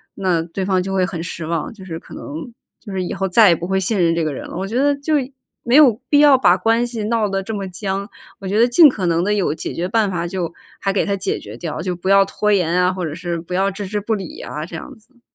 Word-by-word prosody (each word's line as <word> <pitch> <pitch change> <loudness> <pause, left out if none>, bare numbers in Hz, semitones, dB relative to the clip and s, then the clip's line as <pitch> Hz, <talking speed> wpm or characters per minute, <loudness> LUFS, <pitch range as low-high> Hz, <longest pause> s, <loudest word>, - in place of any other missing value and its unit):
那 180 -4 +1
对 170 +3 -4
方 190 -1 +1
就 195 +1 -4
会 185 -1 +2
很 175 -3 -5
失 170 -1 -5
望， 165 -1 -2
就 195 -4 -12
是 165 -3 -6
可 - - -15
能 160 +11 -7 0.3
就 210 - -10
是 190 -1 -2
以 175 - -4
后 195 0 -1
再 210 +1 +6
也 170 - +5
不 170 +2 -5
会 190 0 +1
信 190 +2 0
任 165 0 +2
这 165 - 0
个 155 -2 -1
人 - - -7
了。 - - -7
我 190 - -2
觉 220 - -5
得 285 +2 +3
就 285 +3 -3 0.5
没 240 +1 +2
有 260 -6 +6
必 290 - +4
要 290 -2 +7
把 180 -7 +5
关 230 +3 +2
系 230 -3 -5
闹 220 -1 0
得 195 0 -2
这 220 - -5
么 200 -2 -4
僵。 195 +2 -4 0.3
我 195 - -7
觉 205 +3 +1
得 235 - +6
尽 295 +6 +7
可 200 -8 -3
能 170 0 +1
地 205 +3 +1
有 190 -8 +1
解 - - -5
决 175 +2 -2
办 215 0 +1
法， 175 -2 -2
就 175 -2 -3 0.3
还 195 - 0
给 195 - 0
他 200 - 0
解 190 - -2
决 105 - -10
掉， 160 +2 -5
就 180 +1 -2
不 175 +2 -4
要 195 0 +6
拖 210 +2 -1
延 180 -5 +2
呀， 180 +1 +3
或 185 -1 -4
者 155 - -4
是 170 0 -4
不 170 +2 -8
要 190 +2 +2
置 200 +1 -6
之 205 +2 -3
不 220 +2 -1
理 190 -5 -7
呀 150 +1 -6
这 170 - -9
样 160 - -9
子。 240 +3 -28
190 Hz, 315 characters per minute, -19 LUFS, 175-215 Hz, 0.5 s, 要